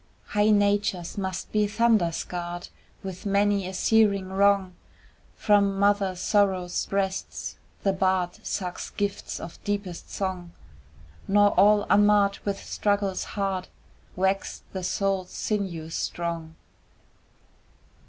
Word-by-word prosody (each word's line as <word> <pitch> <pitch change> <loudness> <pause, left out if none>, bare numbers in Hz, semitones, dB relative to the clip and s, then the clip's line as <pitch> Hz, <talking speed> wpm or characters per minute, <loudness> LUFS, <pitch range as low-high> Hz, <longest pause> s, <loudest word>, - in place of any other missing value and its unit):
High 210 +1 +2
natures 205 -4 +1
must 190 -2 -4
be 210 -1 +2
thunder 215 -5 +3
scarred 175 +1 -5 0.3
With 190 +1 -6
many 200 -1 +2
a 190 - -6
searing 200 -3 +3
wrong; 195 -1 +3 0.6
From 200 -2 +3
mother 200 -1 +2
Sorrow's 185 -1 +1
breasts 195 -1 -3 0.2
the 195 - +2
bard 185 -2 0
Sucks 180 -3 -4
gifts 205 -1 -3
of 165 - -9
deepest 200 -4 -4
song, 185 -3 -4 0.7
Nor 205 +1 +5
all 205 0 +5
unmarred 205 -1 +4
with 200 -1 -1
struggles 200 -2 0
hard 195 -2 -1 0.5
Wax 190 +1 -1
the 190 - -3
Soul's 195 0 -1
sinews 175 -7 -3
strong. 165 -2 -3
195 Hz, 110 wpm, -26 LUFS, 185-205 Hz, 0.7 s, Nor